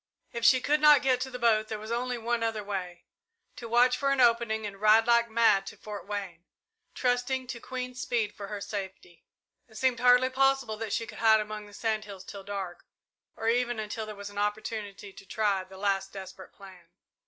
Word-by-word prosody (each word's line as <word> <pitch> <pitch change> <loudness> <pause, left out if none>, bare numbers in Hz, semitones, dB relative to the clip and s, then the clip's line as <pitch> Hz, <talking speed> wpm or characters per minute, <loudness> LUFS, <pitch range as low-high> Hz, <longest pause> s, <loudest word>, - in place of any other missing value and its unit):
If 235 - -5
she 255 +1 +6
could 300 +3 +1
not 300 -3 +7
get 255 -2 +2
to 265 - -2
the 250 - -6
boat 220 -3 +2
there 215 - -4
was 215 +2 -8
only 245 +1 -1
one 235 0 -1
other 225 -2 -1
way 180 -4 -5 0.5
to 235 - -8
watch 245 +2 +4
for 275 - 0
an 275 -1 +1
opening 230 -3 +3
and 200 -1 -8
ride 215 +1 +6
like 235 0 +3
mad 220 -4 +3
to - - -8
Fort 210 -2 -8
Wayne, 195 -5 -5 0.5
trusting 250 +1 0
to 245 -1 -6
Queen's 250 0 -6
speed 230 -4 -1
for 200 - -8
her 205 0 -5
safety. 190 -4 -7 0.4
It 220 - -20
seemed 255 -1 +1
hardly 250 +1 +5
possible 270 -3 +2
that 220 -1 -5
she 230 - -1
could - - -11
hide 220 -1 +5
among 210 0 -5
the 205 - -16
sand 215 -1 -1
hills 195 -3 -10
till 195 0 -9
dark, 195 -3 -6 0.5
or 225 - -4
even 240 0 +1
until 215 +1 -4
there 215 - -7
was 200 0 -8
an 205 - -6
opportunity 210 -1 -4
to 195 - -13
try 205 -3 0
the 190 +1 -14
last 195 -1 -1
desperate 190 -1 -10
plan. 185 -4 -15
220 Hz, 210 wpm, -28 LUFS, 200-245 Hz, 0.5 s, not